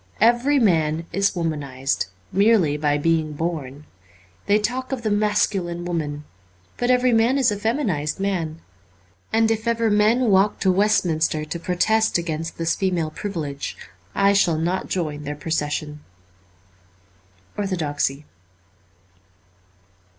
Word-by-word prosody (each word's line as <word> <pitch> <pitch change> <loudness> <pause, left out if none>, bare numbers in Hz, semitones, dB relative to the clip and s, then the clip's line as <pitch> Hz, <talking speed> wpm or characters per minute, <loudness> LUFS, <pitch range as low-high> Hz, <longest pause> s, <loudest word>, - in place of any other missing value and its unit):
Every 240 +6 +4
man 165 - +2
is 195 0 +2
womanized, 140 - -2 0.2
merely 195 -7 +3
by 145 -1 +1
being 160 0 0
born. 150 -3 -4 0.6
They 205 +1 +4
talk 250 +5 -2
of 260 -3 -3
the 215 - 0
mascu 205 -2 +1
line 175 0 -5
woman; 150 -4 -3 0.5
but 245 - -1
every 250 -1 +3
man 230 +4 +3
is 260 -5 +3
a - - -1
feminized 205 - -1
man. 170 -5 -2 0.7
And 225 0 +3
if 220 +1 -2
ever 230 -1 +1
men 215 +3 +3
walk 195 +2 +3
to 190 - +3
Westminster 165 -6 +1
to 170 +3 -5
protest 220 +6 +1
against 165 -1 -4
this 165 0 0
female 180 -5 -1
privilege, 155 -8 -5 0.4
I 200 0 +4
shall 175 -5 +3
not 175 +4 -2
join 155 -5 -2
their 145 0 -5
procession. 150 0 -3 0.8
' 90 0 -34
Orthodoxy. 150 -7 -2
175 Hz, 130 wpm, -22 LUFS, 150-210 Hz, 0.8 s, Every